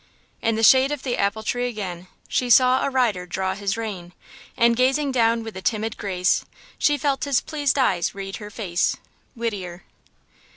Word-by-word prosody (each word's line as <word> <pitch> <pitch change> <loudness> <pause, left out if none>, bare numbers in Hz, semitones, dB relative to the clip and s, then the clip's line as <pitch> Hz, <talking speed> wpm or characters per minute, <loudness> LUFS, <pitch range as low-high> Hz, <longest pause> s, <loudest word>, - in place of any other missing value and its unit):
In 225 0 +1
the 225 - -1
shade 260 +4 +6
of 295 -3 -4
the 250 -3 -1
apple 200 +2 -1
tree 245 +3 -1
again 185 -6 -6 0.2
She 250 - -1
saw 255 +2 +5
a - - +1
rider 230 -9 0
draw 190 +1 -2
his 200 +1 -2
rein, 190 -6 -6 0.4
And 235 -1 +4
gazing 270 +3 +2
down 230 -2 +2
with 225 -2 -8
a 190 - -6
timid 220 +2 -1
grace, 185 -2 0 0.4
She 295 -1 +3
felt 280 -2 -1
his 280 -3 +2
pleased 290 -3 -1
eyes 190 -11 +1
read 195 0 -6
her 210 -1 -9
face. 185 -5 -1 0.4
–WHITTIER. 195 -7 -4
225 Hz, 175 wpm, -23 LUFS, 195-255 Hz, 0.4 s, shade